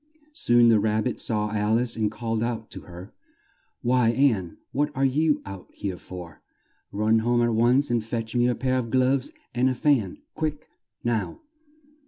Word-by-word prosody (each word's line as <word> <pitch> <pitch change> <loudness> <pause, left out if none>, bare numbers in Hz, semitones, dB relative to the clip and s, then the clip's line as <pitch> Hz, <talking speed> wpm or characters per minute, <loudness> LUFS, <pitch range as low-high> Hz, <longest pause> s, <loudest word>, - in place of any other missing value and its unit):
Soon 120 - +4
the 110 -2 +5
Rab 110 +1 +1
bit 125 - -3
saw 105 -2 -1
Al 105 +1 +1
ice 120 0 -2
and 110 -2 0
called 115 0 -3
out 115 -2 -3
to - - -8
her, 90 +5 -10 0.7
"Why, 125 -1 +3
Ann, 115 -9 +1
what 145 +2 0
are 135 +1 +2
you 150 +3 +1
out 95 -2 -9
here 95 -3 -4
for? 90 -4 -10 0.5
Run 110 +2 +2
home 120 +1 +2
at 120 -1 +1
once, 120 +5 +3
and 120 -2 +1
fetch 115 +1 -4
me 120 0 +3
a 125 - +1
pair 130 0 0
of 115 -2 -4
gloves 130 +2 +1 0.2
and 125 +2 +2
a 130 - -1
fan! 120 -9 +1 0.2
Quick, 155 -1 -3 0.4
now!" 120 - -2
120 Hz, 180 wpm, -25 LUFS, 110-130 Hz, 0.7 s, the